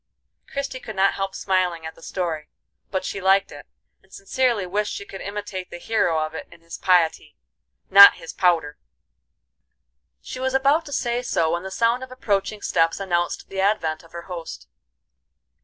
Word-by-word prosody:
Christie 275 Hz, -2 st, -4 dB
could 220 Hz, -4 st, -8 dB
not 195 Hz, +1 st, +3 dB
help 195 Hz, -1 st, -3 dB
smiling 180 Hz, -4 st, 0 dB
at 160 Hz, -, -6 dB
the -, -, -19 dB
story, 165 Hz, -4 st, -3 dB, 0.4 s
but 190 Hz, -1 st, -2 dB
she 195 Hz, -, -4 dB
liked 195 Hz, +1 st, +3 dB
it, 145 Hz, -, -11 dB, 0.3 s
and 190 Hz, -, -29 dB
sincerely 230 Hz, +1 st, 0 dB
wished 205 Hz, +3 st, -1 dB
she 200 Hz, -, -7 dB
could 195 Hz, -, -9 dB
imitate 200 Hz, -2 st, -6 dB
the -, -, -8 dB
hero 175 Hz, -6 st, +1 dB
of 155 Hz, -, -9 dB
it -, -, -7 dB
in 165 Hz, -, -16 dB
his 165 Hz, 0 st, -9 dB
piety, 175 Hz, -4 st, +2 dB, 0.5 s
not 200 Hz, +1 st, +10 dB
his 165 Hz, -, -9 dB
powder. 165 Hz, -5 st, +1 dB, 1.4 s
She 255 Hz, -, -8 dB
was 260 Hz, 0 st, -1 dB
about 285 Hz, +4 st, +3 dB
to -, -, -9 dB
say 245 Hz, -3 st, -1 dB
so 165 Hz, -9 st, 0 dB
when 170 Hz, +1 st, -1 dB
the 190 Hz, -, -6 dB
sound 230 Hz, +5 st, +1 dB
of 260 Hz, -, -10 dB
approaching 210 Hz, -4 st, -2 dB
steps 165 Hz, +3 st, +1 dB
announced 175 Hz, -3 st, -1 dB
the 190 Hz, 0 st, -2 dB
advent 165 Hz, -6 st, 0 dB
of 165 Hz, -, -19 dB
her 170 Hz, 0 st, -8 dB
host. 170 Hz, -3 st, -8 dB
190 Hz, 175 wpm, -23 LUFS, 170-215 Hz, 1.4 s, not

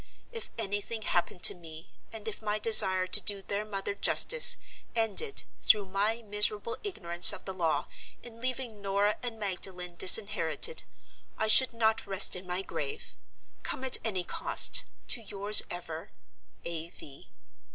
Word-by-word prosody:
If 460 Hz, -2 st, -9 dB
anything 215 Hz, +1 st, -5 dB
happened 175 Hz, -1 st, -3 dB
to -, -, +7 dB
me, 165 Hz, -1 st, -15 dB, 0.2 s
and 225 Hz, -2 st, -10 dB
if 220 Hz, -, -7 dB
my 210 Hz, -1 st, -3 dB
desire 195 Hz, -4 st, +5 dB
to 185 Hz, -, +3 dB
do 200 Hz, -1 st, 0 dB
their 200 Hz, +1 st, -5 dB
mother 200 Hz, -1 st, -6 dB
justice, 480 Hz, -, +3 dB, 0.4 s
ended 235 Hz, -, -1 dB, 0.2 s
(through 210 Hz, -2 st, +2 dB
my 205 Hz, +5 st, -3 dB
miserable 210 Hz, +1 st, -1 dB
ignorance 175 Hz, -, +4 dB
of -, -, -11 dB
the 190 Hz, -, -7 dB
law) 160 Hz, -5 st, -3 dB, 0.4 s
in 230 Hz, -1 st, -14 dB
leaving 250 Hz, -4 st, -6 dB
Norah 200 Hz, +1 st, -2 dB
and 240 Hz, -2 st, -7 dB
Magdalen 180 Hz, -3 st, -7 dB
disinherited, 205 Hz, -, +2 dB, 0.5 s
I 220 Hz, -, -2 dB
should 255 Hz, +4 st, +6 dB
not 220 Hz, -2 st, -2 dB
rest 195 Hz, -1 st, +1 dB
in 180 Hz, 0 st, -11 dB
my 180 Hz, +2 st, -5 dB
grave! 435 Hz, -, -7 dB, 0.5 s
Come 260 Hz, -, -7 dB
at 260 Hz, -, +6 dB
any 195 Hz, -5 st, -3 dB
cost, -, -, +2 dB, 0.2 s
to 240 Hz, -, +1 dB
yours 205 Hz, 0 st, +6 dB
ever, 165 Hz, -2 st, -9 dB, 0.6 s
"A. 170 Hz, -1 st, -7 dB
V." 140 Hz, -5 st, -15 dB
205 Hz, 150 wpm, -27 LUFS, 185-225 Hz, 0.6 s, to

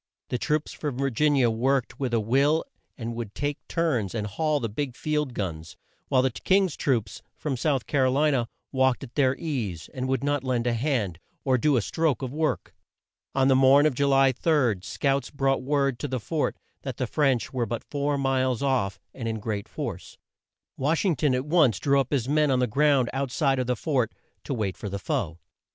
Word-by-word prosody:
The 125 Hz, -, -1 dB
troops 150 Hz, +2 st, -1 dB
from 145 Hz, -5 st, -4 dB
Vir 135 Hz, 0 st, 0 dB
gin 145 Hz, +5 st, +2 dB
i -, -, +3 dB
a 120 Hz, -2 st, +4 dB
worked 125 Hz, +2 st, 0 dB
with 130 Hz, -3 st, -1 dB
a 115 Hz, -, +2 dB
will 140 Hz, +8 st, +2 dB, 0.3 s
and 115 Hz, -1 st, -4 dB
would 115 Hz, -3 st, -6 dB
take 145 Hz, 0 st, -2 dB
turns 125 Hz, -, 0 dB
and 105 Hz, -2 st, -2 dB
haul 150 Hz, +8 st, 0 dB
the 115 Hz, -, -2 dB
big 125 Hz, +4 st, -4 dB
field 150 Hz, -4 st, -1 dB
guns, 80 Hz, -5 st, -5 dB, 0.3 s
while 130 Hz, -2 st, +3 dB
the 130 Hz, -, +2 dB
King's 190 Hz, -, +1 dB
troops, 115 Hz, -8 st, -1 dB, 0.2 s
from 145 Hz, -4 st, -2 dB
South 135 Hz, -1 st, 0 dB
Car 135 Hz, -3 st, +2 dB
o -, -, +2 dB
li 150 Hz, +3 st, +3 dB
na, 125 Hz, -4 st, +1 dB, 0.3 s
walked 130 Hz, -1 st, +2 dB
at 125 Hz, -2 st, -10 dB
their 135 Hz, -2 st, +2 dB
ease, 120 Hz, -, -4 dB
and 130 Hz, 0 st, -3 dB
would 135 Hz, +1 st, 0 dB
not 145 Hz, -1 st, 0 dB
lend 125 Hz, -2 st, 0 dB
a 120 Hz, -, +2 dB
hand, 115 Hz, -, -1 dB, 0.2 s
or 130 Hz, -2 st, +3 dB
do 140 Hz, +2 st, +3 dB
a 115 Hz, -, +1 dB
stroke 160 Hz, -2 st, 0 dB
of 130 Hz, 0 st, -4 dB
work. 155 Hz, +1 st, -1 dB, 0.6 s
On 135 Hz, -1 st, +3 dB
the 135 Hz, -, +5 dB
morn 135 Hz, +2 st, +6 dB
of 155 Hz, -, +3 dB
Ju 140 Hz, +3 st, +1 dB
ly 135 Hz, -1 st, +5 dB
3, 130 Hz, -, +2 dB
scouts 135 Hz, +5 st, -1 dB
brought 135 Hz, -1 st, 0 dB
word 140 Hz, -2 st, 0 dB
to 145 Hz, -, -3 dB
the 130 Hz, -2 st, -2 dB
fort 155 Hz, +6 st, -1 dB, 0.2 s
that 130 Hz, -4 st, -5 dB
the 130 Hz, -, -1 dB
French 135 Hz, -1 st, +1 dB
were 120 Hz, -3 st, -1 dB
but 115 Hz, +1 st, -4 dB
four 145 Hz, 0 st, -1 dB
miles 130 Hz, -2 st, +1 dB
off, 130 Hz, -8 st, 0 dB
and 115 Hz, -3 st, -5 dB
in 110 Hz, -1 st, -2 dB
great 105 Hz, -2 st, -4 dB
force. -, -, -6 dB, 0.6 s
Wash 155 Hz, +8 st, +1 dB
ing 180 Hz, -5 st, +3 dB
ton 130 Hz, 0 st, +2 dB
at 130 Hz, +1 st, -2 dB
once 150 Hz, -, +4 dB
drew 140 Hz, +6 st, +2 dB
up 135 Hz, -, 0 dB
his 130 Hz, -5 st, 0 dB
men 150 Hz, +1 st, +3 dB
on 130 Hz, -, +3 dB
the 125 Hz, -, +2 dB
ground 135 Hz, +1 st, +3 dB
out 135 Hz, 0 st, -1 dB
side 135 Hz, -1 st, +1 dB
of 125 Hz, -, -1 dB
the 125 Hz, -, +1 dB
fort, 125 Hz, -2 st, 0 dB, 0.3 s
to 135 Hz, -, -2 dB
wait 100 Hz, -5 st, -2 dB
for 105 Hz, -, -5 dB
the 100 Hz, -, -3 dB
foe. 85 Hz, -3 st, -2 dB
130 Hz, 220 wpm, -26 LUFS, 120-145 Hz, 0.6 s, morn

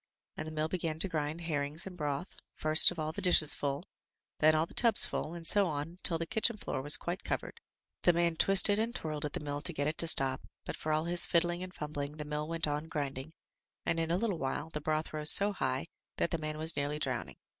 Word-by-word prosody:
And 155 Hz, -, -7 dB
the -, -, -7 dB
mill 155 Hz, 0 st, -2 dB
began 165 Hz, -2 st, -4 dB
to 180 Hz, -, -2 dB
grind 155 Hz, -1 st, -4 dB
herrings 150 Hz, -1 st, -4 dB
and 190 Hz, -2 st, -9 dB
broth, 150 Hz, +2 st, -5 dB, 0.2 s
first 155 Hz, +1 st, +5 dB
of 180 Hz, -, -8 dB
all 155 Hz, -1 st, -3 dB
the -, -, -8 dB
dishes 170 Hz, -4 st, +3 dB
full, 140 Hz, +2 st, -4 dB, 0.6 s
then 155 Hz, 0 st, +4 dB
all 155 Hz, +1 st, +1 dB
the -, -, -17 dB
tubs 230 Hz, -2 st, +7 dB
full, 165 Hz, -, -5 dB
and 170 Hz, -1 st, -10 dB
so 200 Hz, +2 st, +2 dB
on 160 Hz, +3 st, -6 dB
till 165 Hz, -, +3 dB
the 165 Hz, -, -4 dB
kitchen 220 Hz, +3 st, 0 dB
floor 130 Hz, -, -5 dB
was 145 Hz, +3 st, +5 dB
quite 175 Hz, +4 st, -6 dB
covered. -, -, -5 dB, 0.4 s
The 175 Hz, -, +4 dB
man 170 Hz, -1 st, 0 dB
twisted 195 Hz, +4 st, +4 dB
and 230 Hz, +2 st, -3 dB
twirled 155 Hz, -5 st, -3 dB
at 145 Hz, -, -6 dB
the -, -, -4 dB
mill 145 Hz, -1 st, -5 dB
to 175 Hz, +3 st, +1 dB
get 145 Hz, -1 st, -3 dB
it 155 Hz, +2 st, -3 dB
to 165 Hz, -, +5 dB
stop, 135 Hz, -3 st, +6 dB, 0.2 s
but -, -, -5 dB
for 155 Hz, -, -5 dB
all 155 Hz, +1 st, 0 dB
his 175 Hz, 0 st, +1 dB
fiddling 175 Hz, +1 st, 0 dB
and 185 Hz, 0 st, -7 dB
fumbling 150 Hz, -2 st, -7 dB
the 150 Hz, -, -7 dB
mill 150 Hz, 0 st, -5 dB
went 165 Hz, -1 st, -2 dB
on 150 Hz, +2 st, -4 dB
grind 145 Hz, -5 st, -4 dB
ing, 150 Hz, +5 st, -11 dB, 0.5 s
and 165 Hz, -, -1 dB
in 165 Hz, 0 st, -2 dB
a 170 Hz, -, 0 dB
little 200 Hz, -5 st, -3 dB
while 135 Hz, +4 st, -4 dB
the 150 Hz, -, -6 dB
broth 155 Hz, +1 st, -3 dB
rose 155 Hz, 0 st, +2 dB
so 200 Hz, +1 st, +9 dB
high 130 Hz, -8 st, -3 dB, 0.3 s
that -, -, -1 dB
the 165 Hz, -, -2 dB
man 155 Hz, 0 st, -5 dB
was 160 Hz, +1 st, +1 dB
nearly 145 Hz, +1 st, -2 dB
drowning. 130 Hz, -5 st, -4 dB
155 Hz, 245 wpm, -31 LUFS, 150-175 Hz, 0.6 s, so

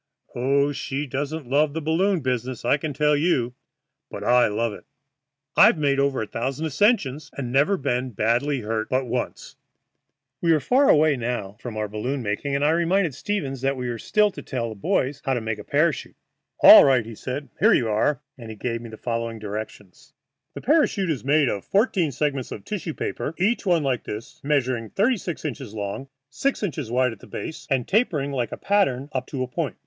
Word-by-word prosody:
Oh, 140 Hz, +3 st, +2 dB
she 140 Hz, +1 st, -3 dB
doesn't 145 Hz, +2 st, -4 dB
love 145 Hz, +3 st, +2 dB
the 160 Hz, -, -2 dB
balloon 170 Hz, +4 st, +1 dB
business, 125 Hz, -2 st, -3 dB
I 140 Hz, -, +3 dB
can 155 Hz, +1 st, -4 dB
tell 150 Hz, +2 st, +2 dB
you. 145 Hz, -6 st, +1 dB, 0.6 s
But -, -, -7 dB
I 125 Hz, 0 st, +4 dB
love 105 Hz, +1 st, -1 dB
it. -, -, -12 dB, 0.7 s
I've 210 Hz, -3 st, +7 dB
made 140 Hz, -2 st, +1 dB
over 140 Hz, -4 st, +1 dB
a -, -, -4 dB
thousand 135 Hz, +8 st, -3 dB
ascensions, 155 Hz, -, +1 dB
and 125 Hz, -4 st, -4 dB
never 145 Hz, +10 st, +3 dB
been 125 Hz, -1 st, -1 dB
badly 120 Hz, +5 st, 0 dB
hurt 110 Hz, 0 st, -3 dB
but 130 Hz, 0 st, 0 dB
once." 125 Hz, +1 st, -4 dB, 0.8 s
We 165 Hz, -1 st, +4 dB
were 155 Hz, -, +3 dB
far 265 Hz, -, +3 dB
away 150 Hz, -2 st, +5 dB
now 115 Hz, -5 st, -3 dB
from 120 Hz, -3 st, -7 dB
our 105 Hz, 0 st, -1 dB
balloon 125 Hz, +6 st, -3 dB
making, 115 Hz, +7 st, -2 dB
and 140 Hz, +1 st, +1 dB
I 150 Hz, -, +4 dB
reminded 170 Hz, 0 st, +1 dB
Stevens 140 Hz, -5 st, -3 dB
that 135 Hz, 0 st, 0 dB
we 125 Hz, -1 st, -3 dB
had 115 Hz, -2 st, -4 dB
still 210 Hz, -1 st, +2 dB
to -, -, -9 dB
tell 120 Hz, -4 st, -3 dB
the 110 Hz, -, -7 dB
boys 130 Hz, +7 st, -1 dB
how 135 Hz, -, 0 dB
to -, -, 0 dB
make 110 Hz, -1 st, -4 dB
a -, -, -7 dB
parachute. 150 Hz, +2 st, 0 dB, 0.5 s
"All -, -, +11 dB
right," 130 Hz, -4 st, +3 dB
said 130 Hz, +6 st, -5 dB
he; 140 Hz, -, -21 dB, 0.2 s
"here -, -, +6 dB
you 120 Hz, -, +1 dB
are," 110 Hz, +6 st, +1 dB, 0.2 s
and 115 Hz, -2 st, -9 dB
he 110 Hz, -, -7 dB
gave 115 Hz, +1 st, -3 dB
me 120 Hz, -, -9 dB
the 110 Hz, -, -10 dB
following 115 Hz, -1 st, -3 dB
directions: 105 Hz, -2 st, -8 dB, 0.4 s
"The -, -, -6 dB
parachute 255 Hz, -, +2 dB
is 145 Hz, -, -3 dB
made 145 Hz, +1 st, +3 dB
of 100 Hz, -4 st, -2 dB
fourteen 195 Hz, -, +1 dB
segments 140 Hz, -1 st, -2 dB
of 100 Hz, -, -8 dB
tissue 180 Hz, -6 st, -4 dB
paper, 160 Hz, -, -4 dB
each 210 Hz, +3 st, 0 dB
one 170 Hz, -4 st, +3 dB
like 130 Hz, -4 st, -1 dB
this, 105 Hz, +2 st, -8 dB
measuring 130 Hz, -6 st, 0 dB
thirty 230 Hz, +5 st, +2 dB
six 175 Hz, -4 st, -6 dB
inches 135 Hz, -6 st, -5 dB
long, 105 Hz, +6 st, -4 dB, 0.2 s
six 270 Hz, -, -1 dB
inches 150 Hz, -, -3 dB
wide 125 Hz, +1 st, +2 dB
at 110 Hz, -, -11 dB
the -, -, -14 dB
base, 160 Hz, -, -7 dB
and 130 Hz, -4 st, 0 dB
tapering 165 Hz, -, +1 dB
like 125 Hz, -4 st, -1 dB
the -, -, -6 dB
pattern 165 Hz, -10 st, +1 dB
up 130 Hz, -1 st, -3 dB
to 130 Hz, -3 st, -3 dB
a -, -, -4 dB
point. 130 Hz, -, -3 dB
135 Hz, 205 wpm, -24 LUFS, 120-155 Hz, 0.8 s, All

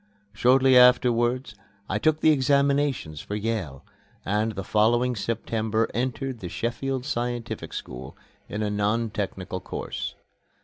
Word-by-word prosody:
Shortly 130 Hz, +4 st, +4 dB
afterwards 125 Hz, -1 st, +4 dB, 0.3 s
I -, -, -1 dB
took 155 Hz, 0 st, +1 dB
my -, -, +6 dB
examinations 140 Hz, -, +2 dB
for 105 Hz, -, -5 dB
Yale, 105 Hz, -10 st, -3 dB, 0.4 s
and 105 Hz, +3 st, 0 dB
the 95 Hz, -, -5 dB
following 120 Hz, +5 st, +2 dB
September 110 Hz, 0 st, -1 dB
entered 130 Hz, +1 st, -2 dB
the 90 Hz, -, -6 dB
Sheffield 125 Hz, +5 st, -3 dB
Scientific 120 Hz, -3 st, -3 dB
School, 65 Hz, +1 st, -7 dB, 0.3 s
in 105 Hz, +1 st, -3 dB
a 105 Hz, -, -1 dB
non 105 Hz, +2 st, 0 dB
technical 95 Hz, -3 st, -4 dB
course. 65 Hz, -7 st, -5 dB
115 Hz, 125 wpm, -25 LUFS, 105-130 Hz, 0.4 s, my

